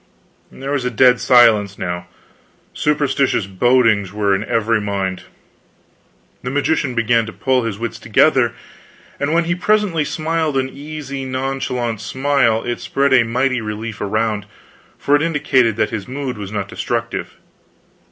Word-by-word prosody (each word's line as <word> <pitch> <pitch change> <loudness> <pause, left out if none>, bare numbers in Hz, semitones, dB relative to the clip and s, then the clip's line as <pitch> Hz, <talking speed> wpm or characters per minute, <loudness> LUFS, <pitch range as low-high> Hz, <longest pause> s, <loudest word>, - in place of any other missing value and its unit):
There 135 +1 -6
was 140 -3 0
a 125 - 0
dead 125 +1 +4
silence 110 -5 +4
now; 90 0 -4 0.7
superstitious 140 -6 +1
bodings 110 -1 +2
were 100 -1 +1
in 95 +2 0
every 115 0 +1
mind. 100 -2 -3 1.2
The 125 - -4
magician 145 -1 0
began 115 -1 +2
to - - -6
pull 130 -1 0
his 110 -3 -3
wits 115 +1 -5
together, - - +3 0.7
and 145 +1 -1
when 170 +1 +3
he 170 +1 0
presently 185 -3 +1
smiled 155 -1 -1
an 130 0 0
easy, 140 -1 -7
nonchalant 130 -3 -3
smile, 120 0 +1
it 120 0 -3
spread 140 0 0
a 130 - +7
mighty 125 +2 0
relief 105 0 -5
around; 105 0 -1 0.5
for 145 - +2
it 145 - +2
indicated 145 -8 +2
that 110 - 0
his 100 -3 -5
mood 130 0 -4
was 100 -2 -7
not 100 -2 -3
destructive. 115 +2 -4
125 Hz, 145 wpm, -18 LUFS, 110-140 Hz, 1.2 s, a